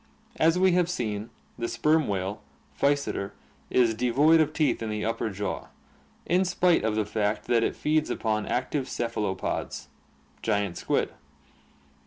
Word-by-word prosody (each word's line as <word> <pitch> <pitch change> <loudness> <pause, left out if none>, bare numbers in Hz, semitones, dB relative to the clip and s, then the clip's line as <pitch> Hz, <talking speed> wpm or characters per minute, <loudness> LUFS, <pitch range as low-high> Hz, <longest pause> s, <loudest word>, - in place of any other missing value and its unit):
As 165 +2 +4
we 185 0 +4
have 175 -1 +2
seen, 110 - -3 0.3
the 115 - -1
sperm 150 +7 +2
whale, 100 +1 -2 0.3
Physeter, 140 -8 0 0.4
is 120 -3 +3
devoid 140 +8 +4
of 155 -1 +1
teeth 150 -6 +1
in 110 - -3
the 105 0 -2
upper 115 0 -1
jaw, 100 0 -4 0.6
in 180 +3 +3
spite 180 -1 +2
of 110 -1 0
the 110 -1 +1
fact 105 0 -1
that 115 -1 +3
it - - 0
feeds 155 0 +1
upon 110 -2 -1
active 130 +1 -1
cephalopods 105 -5 -3 0.5
(giant 100 -3 0
squid). - - 0
115 Hz, 145 wpm, -27 LUFS, 105-155 Hz, 0.6 s, As